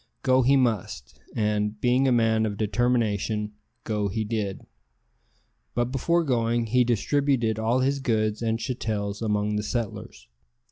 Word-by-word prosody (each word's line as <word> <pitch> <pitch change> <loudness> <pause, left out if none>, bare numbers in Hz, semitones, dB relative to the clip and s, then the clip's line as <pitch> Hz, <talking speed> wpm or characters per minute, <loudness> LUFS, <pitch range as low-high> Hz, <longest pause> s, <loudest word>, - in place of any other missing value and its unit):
Go 130 0 +4
he 135 +3 +4
must, 110 - -2 0.2
and, 105 -1 0
being 125 +3 +2
a - - +3
man 110 -2 +2
of 105 -1 -5
determination, 110 -2 0 0.3
go 105 -2 -1
he 110 +3 -2
did; 105 -3 -3 1.1
but 120 +1 0
before 170 +6 +1
going 120 -4 +1
he 125 +3 +3
distributed 120 -1 +1
all 115 +4 +1
his 140 +2 +1
goods 110 -4 0
and 115 -1 0
chattels 110 -4 -3
among 105 -1 0
the - - 0
settlers. 115 0 -5
115 Hz, 140 wpm, -25 LUFS, 105-125 Hz, 1.1 s, Go